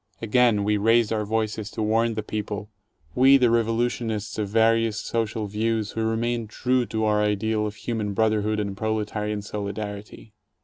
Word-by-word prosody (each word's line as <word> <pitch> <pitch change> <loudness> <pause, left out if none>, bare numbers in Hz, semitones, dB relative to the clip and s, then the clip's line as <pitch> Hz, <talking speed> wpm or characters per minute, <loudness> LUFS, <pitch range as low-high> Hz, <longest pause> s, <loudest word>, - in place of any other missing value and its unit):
Again 115 -2 +3
we 105 +1 +1
raised 115 +1 +3
our 105 -1 -1
voices 110 -1 -2
to 110 - -4
warn 115 +1 +1
the 110 - -3
people, 105 0 -5 0.2
— 95 - -49
we, 135 +2 +7
the 125 -3 +3
revolutionists 115 -2 -1
of 105 -2 -2
various 115 0 +2
social 110 -1 -2
views 110 +1 -1
who 110 - -2
remained 115 0 -1
true 125 +1 0
to 110 0 -2
our 105 0 +2
ideal 105 +1 0
of 105 - -7
human 110 -2 -3
brotherhood 110 0 +1
and 100 -2 -3
proletarian 105 -1 -2
solidarity. 105 +1 -6
110 Hz, 165 wpm, -24 LUFS, 105-115 Hz, 0.2 s, we